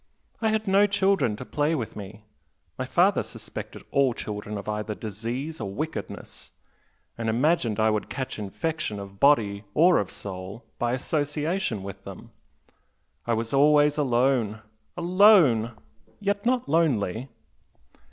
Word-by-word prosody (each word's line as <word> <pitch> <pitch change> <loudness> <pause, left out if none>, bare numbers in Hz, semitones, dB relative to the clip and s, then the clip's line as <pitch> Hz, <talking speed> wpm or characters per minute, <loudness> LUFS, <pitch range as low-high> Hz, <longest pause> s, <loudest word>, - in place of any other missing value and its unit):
I 225 - +2
had 220 0 -1
no 200 +2 +5
children 195 - +2
to 125 - -8
play 150 +4 0
with 120 -7 -4
me 105 +1 -9 0.5
my - - -3
father - - +3
suspected - - -8
all 135 -3 +3
children 105 0 -5
of 100 - -8
either 105 0 -3
disease 115 +9 -5
or 100 - -3
wickedness, 155 +11 -6 0.7
and 115 -1 -1
imagined 120 -2 +1
I 110 0 +4
would 105 -1 -2
catch 130 -4 -4
infection 105 - -3
of 100 0 -10
body 110 -8 +3
or 175 +3 +5
of 100 - -2
soul 95 +3 -8
by 120 0 0
association 150 - -1
with 100 0 -8
them. 100 -2 -10 1.0
I 120 - +2
was 115 +2 -3
always 150 +1 +4
alone 120 -5 +1 0.3
alone! 170 - +5 0.4
yet 205 +1 -1
not 250 -1 +1
lonely!" 135 - +1
125 Hz, 135 wpm, -26 LUFS, 105-160 Hz, 1.0 s, no